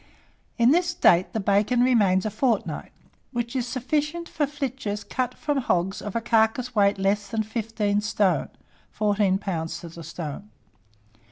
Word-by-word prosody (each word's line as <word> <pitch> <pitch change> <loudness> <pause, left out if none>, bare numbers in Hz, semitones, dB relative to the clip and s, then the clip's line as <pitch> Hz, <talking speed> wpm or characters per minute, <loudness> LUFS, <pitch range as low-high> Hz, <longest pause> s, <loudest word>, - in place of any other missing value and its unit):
In 235 +2 +5
this 350 +3 +3
state 185 - +3
the 220 - -2
bacon 205 +5 +2
remains 210 -7 +3
a 215 - -1
fortnight, 225 0 -1 0.4
which 240 0 -3
is 250 -2 -1
sufficient 300 +7 -2
for 295 -3 -1
flitches 265 -8 -4
cut 250 +4 -2
from 290 -3 -1
nogs 185 -3 0
of 205 0 -6
a 230 - +1
carcass 225 +2 +1
weight 200 -2 +3
less 200 +1 0
than 220 +2 -1
15 215 -2 -1
stone 210 -3 +1 0.4
(14 205 -2 +1
lbs. 170 -5 -3
to 170 - -8
the 165 0 -10
stone). 165 +5 -7
215 Hz, 155 wpm, -25 LUFS, 200-250 Hz, 0.4 s, In